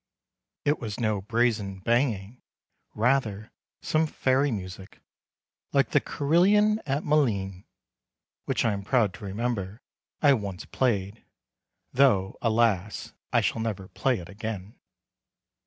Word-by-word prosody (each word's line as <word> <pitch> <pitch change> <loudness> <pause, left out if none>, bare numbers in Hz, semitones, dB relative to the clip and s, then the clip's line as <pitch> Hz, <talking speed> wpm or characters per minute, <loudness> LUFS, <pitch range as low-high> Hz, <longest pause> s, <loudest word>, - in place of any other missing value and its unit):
It 145 +1 +2
was 110 -2 -5
no 110 -4 0
brazen 110 -2 0
banging; 115 0 0 0.5
rather, 110 -3 +1 0.3
some 155 +1 +2
fairy 135 0 +1
music, 95 -4 -6 0.7
like - - +3
the - - +5
carillon 205 +8 +3
at 140 +2 0
Malines 100 -11 0 0.8
(which - - 0
I 115 - +2
am 100 - -3
proud 105 -2 +2
to 105 +2 -9
remember 105 0 -3 0.4
I 145 -2 +6
once 100 -3 -4
played, 105 -4 -1 0.7
though, 120 -8 +3
alas! 110 -4 +1 0.2
I - - +4
shall 115 - -1
never 100 -4 -4
play 130 -3 0
it 85 - -8
again). 105 0 -6
110 Hz, 120 wpm, -27 LUFS, 100-130 Hz, 0.8 s, I